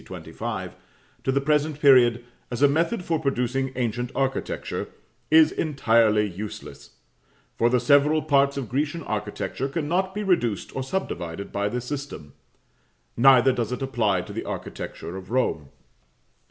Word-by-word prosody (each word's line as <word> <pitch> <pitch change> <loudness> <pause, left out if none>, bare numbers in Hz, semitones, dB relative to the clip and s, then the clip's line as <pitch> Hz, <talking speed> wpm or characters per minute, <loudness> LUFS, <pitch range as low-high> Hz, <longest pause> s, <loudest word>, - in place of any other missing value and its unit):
25) - - -6 0.5
to 130 - +1
the 135 - +2
present 150 +1 0
period, 120 -4 +5 0.2
as 125 +3 -2
a - - +8
method 170 +7 0
for 165 -2 0
producing 135 -2 -1
ancient 120 0 -2
architecture, 135 -1 -2 0.4
is 160 0 +6
entirely 115 -8 +2
useless, 100 +3 -9 0.6
for 120 - +2
the 125 +1 +2
several 145 +5 +4
parts 140 -2 +2
of 135 -4 -3
Grecian 150 +6 -2
architecture 105 +5 -3
cannot 175 +6 -1
be 210 - -2
reduced 120 - 0
or 135 - -2
subdivided 100 - -4
by 100 0 -1
this 125 +2 -4
system; 135 - -6 0.8
neither 130 +1 +6
does 120 -3 -2
it 125 +2 -3
apply 110 -8 +1
to - - -9
the - - -4
architecture 85 - -6
of 95 -1 -9
Rome. 110 - -1
130 Hz, 140 wpm, -24 LUFS, 115-145 Hz, 0.8 s, a